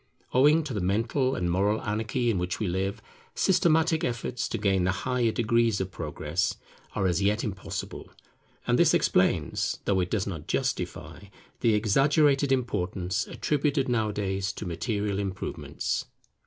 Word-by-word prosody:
Owing 150 +5 +5
to 145 -4 -5
the 105 - -2
mental 115 +8 +1
and 90 -5 -1
moral 100 +4 +2
anarchy 110 +3 0
in 95 - -1
which 90 +1 -2
we 105 - -1
live, 95 +3 -2 0.3
systematic 165 -3 +3
efforts 120 0 -2
to - - -2
gain 95 -3 +2
the 90 - +2
higher 125 -3 +1
degrees 115 -1 +2
of 95 0 -3
Progress 80 +2 -2 0.4
are 100 - 0
as 90 0 +1
yet 105 +3 +1
impossible; 95 -4 -5 0.6
and - - +2
this - - +5
explains, - - +1
though 100 -2 +2
it 90 -1 0
does 105 -4 0
not 85 -7 -6
justify, - - -3 0.3
the 115 -2 +3
exaggerated 140 +6 +3
importance 100 -5 -1
attributed 145 -2 0
nowadays 100 -5 -1
to 105 - -7
material 100 +4 -2
improvements. 95 -2 -3
105 Hz, 145 wpm, -27 LUFS, 95-125 Hz, 0.6 s, Owing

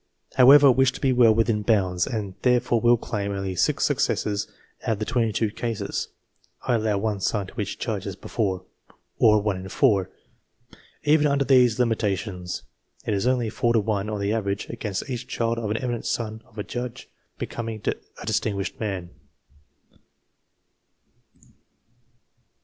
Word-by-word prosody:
However, 140 +3 +8
I - - +9
wish 130 0 +3
to - - -8
be 130 -2 +2
well 120 -2 +6
within 115 -1 +2
bounds, 95 -5 +1
and 105 -5 -3
therefore 120 -2 +2
will 120 0 +5
claim 100 -3 -3
only 95 -1 -3
six - - +2
successes 105 -1 0 0.3
out 115 - 0
of - - -4
the 110 - -3
22 115 -2 0
cases 110 -3 -3 0.6
(I - - +1
allow 110 -3 +1
one 105 0 -1
son 100 +1 0
to 105 +4 -6
each 100 - -4
judge, 105 -3 -3
as 95 - -4
before), 95 -4 -2 0.5
or 105 -1 +6
1 105 -3 0
in 95 +1 -7
4. 95 -2 +2 0.9
Even 150 0 +4
under 140 -1 +1
these 125 -4 +5
limita 115 -5 +1
tions 90 -4 -6 0.4
it - - 0
is 100 +4 0
only 125 -4 +1
4 120 0 +1
to 115 - +4
1, 105 -1 -1
on 105 -1 -3
the 100 +1 0
average, 100 -2 -2
against 105 -3 -4
each 125 -2 -5
child 115 -1 -1
of 110 -3 -3
an 105 - 0
eminent 120 -2 -3
son 110 -1 -3
of 110 - -22
a 105 - -2
judge 120 +1 -6 0.3
becoming 115 -2 -4
a - - -5
distin 105 - 0
guished 100 0 -4
man. 95 -5 -4
110 Hz, 165 wpm, -24 LUFS, 100-120 Hz, 0.9 s, I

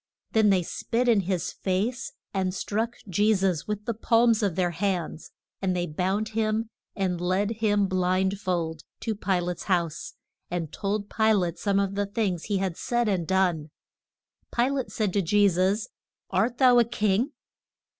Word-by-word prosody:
Then 220 -2 +4
they 185 -3 +3
spit 240 +8 -1
in 230 -4 +5
his 180 -2 -1
face, 205 +6 -2 0.2
and 190 -1 -1
struck 225 +5 -2
Je 205 +4 +3
sus 190 -5 0
with 210 0 -3
the 235 - -1
palms 230 0 +3
of 200 -6 0
their 180 -1 +1
hands. 175 -3 -2 0.3
And 185 -2 0
they 175 -1 0
bound 190 +7 -1
him 220 +1 -1 0.2
and 185 -4 -1
led 185 +4 +1
him 205 -2 +2
blind 185 +1 +1
fold 170 -5 -2 0.2
to 225 - -1
Pi 195 -3 0
late's 175 0 -4
house, 170 -4 -1 0.3
and 170 -3 -3
told 205 +1 -2
Pi 220 +1 +2
late 175 -4 0
some 200 -1 +1
of 200 -1 0
the 200 0 -1
things 200 -5 -1
he 205 -2 0
had 190 -3 -2
said 240 -1 0
and 185 -5 0
done. 180 -5 +1 0.8
Pi 240 +2 +1
late 270 -3 -2
said 210 -4 -1
to 200 - +2
Je 205 +4 +4
sus, 195 +5 +1 0.4
Art 240 +2 +1
thou 250 -2 +6
a - - +6
king? 230 +3 0
195 Hz, 175 wpm, -26 LUFS, 180-220 Hz, 0.8 s, thou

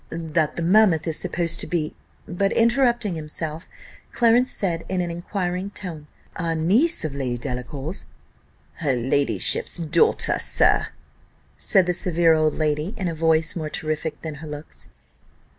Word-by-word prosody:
"That 160 -2 -1
the 170 - -3
mammoth 185 -2 +4
is 160 -2 -2
supposed 170 -2 -1
to - - +1
be 160 -4 -2 0.2
" - - -36
but 195 +2 0
interrupting 235 -3 +2
himself, 160 0 -6 0.4
Clarence 240 +2 +3
said 170 -4 -1
in 185 - -1
an 175 -1 -1
inquiring 180 +2 -3
tone 170 -7 -7 0.3
"A 165 -1 -1
niece 210 - +2
of 150 - -3
Lady 130 -3 -2
Delacour's?" 135 +6 -5 0.7
"Her 145 -5 0
ladyship's 135 +8 +1
daughter, 170 0 +2
sir," - - +3 0.7
said 190 -3 +3
the 180 - 0
severe 170 -3 +3
old 155 -1 +2
lady, 155 +6 -1
in 190 - -2
a - - -3
voice 160 0 +1
more 155 -3 -3
terrific 155 0 -3
than 160 -1 -4
her 160 - -8
looks. 150 +1 -10
165 Hz, 150 wpm, -23 LUFS, 155-185 Hz, 0.7 s, mammoth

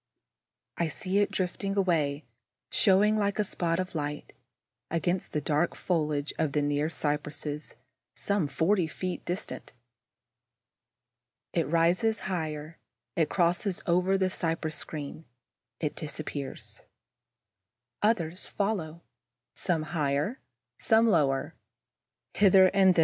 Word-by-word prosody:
I 170 - +1
see 185 +5 -1
it 205 - +3
drifting 195 +2 -2
away, 155 -6 +1 0.5
showing, 210 +2 +4
like 200 -1 0
a 210 - +3
spot 170 -3 -1
of 185 0 -3
light, 150 -2 -4 0.6
against 175 +2 -1
the 150 - -1
dark 155 +3 +1
foliage 150 -4 -1
of 150 -3 +1
the 150 - +2
near 145 +1 +1
cypresses, 150 -1 -2 0.4
some 200 -6 +1
forty 170 +5 +2
feet 180 +2 -4
distant. 180 +4 -5 1.8
It 165 -5 +1
rises 175 +7 +2
higher, 155 -3 -4 0.4
it 160 -4 +2
crosses 175 +2 +1
over 180 +3 +3
the 190 -1 +1
cypress 165 -3 -1
screen, 155 0 -6 0.5
it 150 - -2
disappears. 150 -2 -5 1.2
Others 185 -5 +1
follow, 180 -6 -2 0.5
some 170 -4 0
higher, 150 - -1 0.4
some 225 0 +4
lower, 135 -8 +2 0.8
hither 190 -2 +6
and 190 -2 +5
thither. - - +2
170 Hz, 110 wpm, -29 LUFS, 150-190 Hz, 1.8 s, hither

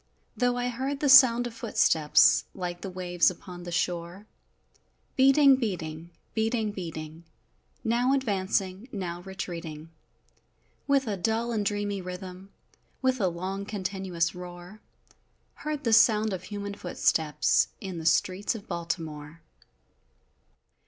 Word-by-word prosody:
Though 245 0 +1
I 245 0 -1
heard 265 +3 -3
the 290 - +1
sound 245 -3 +8
of 240 - -5
footsteps, 150 - +3
Like 175 -2 -5
the 195 - -5
waves 180 -1 +1
upon 180 0 -10
the 175 - -6
shore, 175 +3 -2 0.9
Beating, 275 +1 +6
beating, 170 -8 -4 0.2
beating, 220 -1 0
beating! 165 -4 -7 0.6
Now 240 +3 +2
advancing, 195 -3 -1
now 175 -4 -5
retreating 170 -4 -7 1.0
With 275 -1 +3
a 210 -3 -2
dull 225 +5 -1
and 215 -3 0
dreamy 205 -1 -2
rhythm 185 +1 -8 0.5
With 260 -2 +1
a 190 - +3
long, 185 +3 -4
continuous 190 -4 -2
roar 180 +3 -10 0.7
Heard 300 -1 -5
the 230 -3 +1
sound 220 -2 +5
of 185 -1 -5
human 200 0 -5
footsteps, 160 -5 +1
In 190 -4 -6
the 160 - -7
streets 185 +7 +1
of 205 - -9
Baltimore! 165 -3 -5
190 Hz, 125 wpm, -27 LUFS, 175-225 Hz, 1.0 s, sound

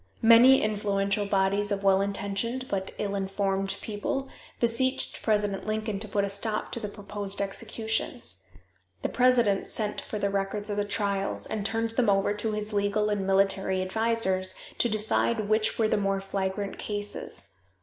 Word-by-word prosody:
Many 235 +4 +7
influential 200 -1 0
bodies 200 +1 +1
of 200 0 -1
well 195 0 +4
intentioned 200 +6 -2
but 190 -1 -2
ill 200 -1 -2
informed 195 0 -1
people 220 +6 -3 0.3
beseeched 250 +3 +1
President 210 -2 0
Lincoln 215 -1 -2
to 215 - -4
put 200 0 0
a - - 0
stop 210 +2 -2
to - - -1
the 215 - -4
proposed 205 -1 -4
executions. 220 +2 -2 0.6
The - - 0
president 240 -6 +3
sent 210 -2 0
for 215 - -5
the 200 -1 0
records 200 +1 -2
of 205 - -2
the 205 - +1
trials, 200 -1 -1
and 215 -2 -3
turned 225 +2 0
them 235 -1 +1
over 195 +1 +2
to 210 +1 -1
his 210 0 -4
legal 205 +1 +1
and 205 -1 0
military 195 -1 +2
advisors 190 -2 +1 0.2
to 240 - +2
decide 215 0 +1
which 215 +1 +2
were 225 - +3
the - - +1
more 195 -1 0
flagrant 195 +1 -3
cases. 205 - -3
205 Hz, 160 wpm, -27 LUFS, 195-220 Hz, 0.6 s, Many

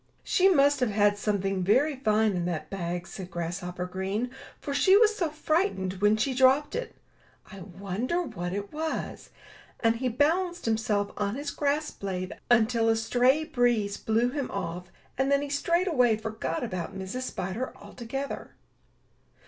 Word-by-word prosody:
"She 380 0 +4
must 285 -5 +4
have 250 -3 +1
had 205 0 +3
something 195 -2 0
very 275 +10 +3
fine 220 -4 +2
in 175 -1 -1
that 155 -3 -4
bag," 175 -2 -3
said 185 0 -8
Grasshopper 180 +1 -4
Green, 195 +6 -3 0.3
"for 280 - -4
she 380 +7 +5
was 435 -1 +4
so 340 -6 0
fright 315 +5 0
ened 190 0 -4
when 210 +1 +4
she 260 +5 0
dropped 265 +3 +4
it. - - -4 0.6
I 195 - -9
wonder 200 - -3
what 175 - -5
it 200 +1 -5
was" 315 +1 -4 0.3
— - - -24
and 230 0 +3
he 255 +1 -1
balanced 345 +8 +1
himself 220 -2 0
on 205 +1 -1
his 285 +1 -4
grass 295 +1 0
blade 185 -2 -4 0.2
until 230 -1 +4
a 225 - +4
stray 245 +6 +2
breeze 240 -9 +1
blew 230 +3 +1
him 280 -1 -3
off, 180 +2 -5 0.3
and 270 +1 +2
then 280 0 +3
he 290 - -5
straightway 285 - +2
forgot 220 +2 -3
about 185 -3 -4
Mrs. 190 +7 -4
Spider 225 0 -4
altogether. 270 +4 -6
225 Hz, 165 wpm, -28 LUFS, 195-280 Hz, 0.6 s, she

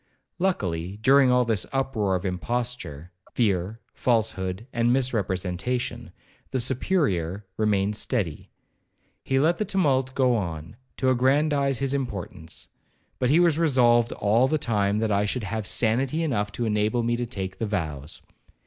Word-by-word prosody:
Luckily, 95 - -1
during 135 +1 +6
all 125 0 +3
this 110 -5 0
uproar 125 -8 0
of 90 +2 -3
imposture, 95 - -3 0.2
fear, 105 -1 0
falsehood, 110 -4 0
and 120 0 +2
misrepresentation, 120 -1 -1 0.4
the 130 - -1
Superior, 115 - 0
remained 105 -1 +1
steady. 100 - -3 0.7
He 135 - 0
let 160 +5 +2
the - - +2
tumult 135 -10 +1
go 130 -2 +3
on, 85 -3 -4 0.2
to 130 -1 +2
aggrandize 140 +1 +2
his 135 +1 -1
importance; 90 - -4 0.5
but 125 - +1
he 155 +5 +5
was 170 -3 +3
resolved 120 -7 +4
all 110 +5 +2
the 155 - +1
time 105 -6 0
that 110 0 0
I 100 0 +2
should 115 +3 -2
have 105 +1 -3
sanity 130 - +1
enough 105 -9 -1
to 120 - -2
enable 110 +2 +1
me 120 +1 +1
to 120 0 -3
take 95 -5 -5
the 115 - -1
vows. 80 -7 -4
115 Hz, 145 wpm, -25 LUFS, 100-130 Hz, 0.7 s, during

